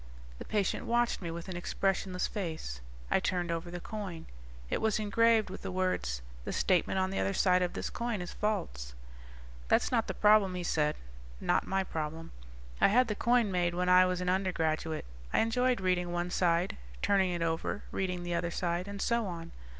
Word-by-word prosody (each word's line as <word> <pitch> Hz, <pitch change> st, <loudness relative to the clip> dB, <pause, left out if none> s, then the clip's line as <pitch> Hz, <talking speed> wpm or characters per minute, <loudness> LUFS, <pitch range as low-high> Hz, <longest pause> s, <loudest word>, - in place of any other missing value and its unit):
The -, -, -7 dB
patient 205 Hz, -3 st, -1 dB
watched 240 Hz, -1 st, +1 dB
me 170 Hz, -, -4 dB
with 170 Hz, +2 st, -6 dB
an 185 Hz, -, -5 dB
expressionless 185 Hz, +1 st, -1 dB
face; 160 Hz, -, -4 dB, 0.3 s
I -, -, +4 dB
turned 175 Hz, -2 st, -1 dB
over 165 Hz, +1 st, -3 dB
the 175 Hz, 0 st, -5 dB
coin. 190 Hz, -4 st, -6 dB, 0.4 s
It -, -, -1 dB
was 220 Hz, -2 st, +2 dB
engraved 220 Hz, 0 st, +3 dB
with 190 Hz, -, -7 dB
the -, -, -4 dB
words: 180 Hz, -, -1 dB, 0.2 s
THE -, -, -4 dB
STATEMENT 185 Hz, 0 st, +2 dB
ON 190 Hz, 0 st, +1 dB
THE 195 Hz, -, -1 dB
OTHER 195 Hz, -, 0 dB
SIDE 185 Hz, -1 st, +4 dB
OF 180 Hz, -1 st, 0 dB
THIS -, -, -4 dB
COIN 235 Hz, -3 st, -2 dB
IS 175 Hz, -1 st, -6 dB
FALSE. 165 Hz, -, -2 dB, 0.7 s
"That's -, -, +3 dB
not 230 Hz, -3 st, +2 dB
the -, -, -3 dB
problem," 210 Hz, -3 st, +5 dB
he 180 Hz, -, -3 dB
said, 150 Hz, -3 st, +1 dB, 0.4 s
"not -, -, +1 dB
my 195 Hz, 0 st, +1 dB
problem. 160 Hz, -2 st, -5 dB, 0.5 s
I -, -, +8 dB
had 245 Hz, +4 st, +4 dB
the 210 Hz, -, -1 dB
coin 235 Hz, -1 st, +2 dB
made 175 Hz, -1 st, +1 dB
when 180 Hz, 0 st, +1 dB
I 185 Hz, 0 st, +7 dB
was 180 Hz, 0 st, -1 dB
an 180 Hz, -, -3 dB
undergraduate. 165 Hz, -4 st, 0 dB, 0.3 s
I -, -, +3 dB
enjoyed 250 Hz, +2 st, +2 dB
reading 180 Hz, -2 st, 0 dB
one 175 Hz, 0 st, -2 dB
side, 175 Hz, 0 st, +1 dB, 0.3 s
turning 195 Hz, -2 st, +3 dB
it 175 Hz, -1 st, -1 dB
over, 165 Hz, +4 st, -2 dB
reading 180 Hz, -2 st, -2 dB
the 175 Hz, 0 st, -3 dB
other 170 Hz, 0 st, 0 dB
side, 175 Hz, +2 st, -2 dB
and 200 Hz, 0 st, -6 dB
so 235 Hz, 0 st, +1 dB
on. 165 Hz, -2 st, -6 dB
185 Hz, 195 wpm, -31 LUFS, 170-205 Hz, 0.7 s, I